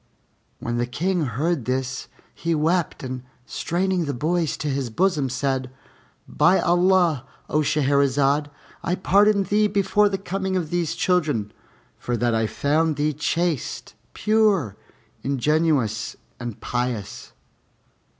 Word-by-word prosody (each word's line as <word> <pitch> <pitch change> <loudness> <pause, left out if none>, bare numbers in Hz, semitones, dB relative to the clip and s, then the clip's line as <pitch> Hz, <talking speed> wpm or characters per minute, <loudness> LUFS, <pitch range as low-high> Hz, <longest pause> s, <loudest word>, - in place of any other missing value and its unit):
When 120 0 -3
the 120 0 0
King 170 +6 0
heard 140 +3 -1
this, 130 0 -2 0.3
he 165 0 -1
wept 160 +1 0
and 130 -1 -4 0.2
straining 180 +3 -1
the 140 -2 -3
boys 160 +4 0
to 150 - -4
his 135 -3 -1
bosom, 150 - +1
said, 130 0 -1 0.6
"By 185 - +3
Allah, 175 -6 +3 0.2
O 150 - +1
Shahrazad, 140 0 +2 0.3
I 175 - 0
pardoned 200 +2 +3
thee 210 +1 +3
before 205 +1 +2
the 195 - -1
coming 190 0 -2
of 165 -4 -3
these 175 -2 0
children, 150 - 0 0.5
for 120 -1 -2
that 120 0 +1
I 110 -1 +1
found 155 +6 +1
thee 150 +1 0
chaste, 165 -5 -2 0.2
pure, 210 - +2 0.5
ingenuous, 140 -5 +1 0.2
and 120 -3 -6
pious! 120 -4 -3
150 Hz, 125 wpm, -23 LUFS, 130-180 Hz, 0.6 s, By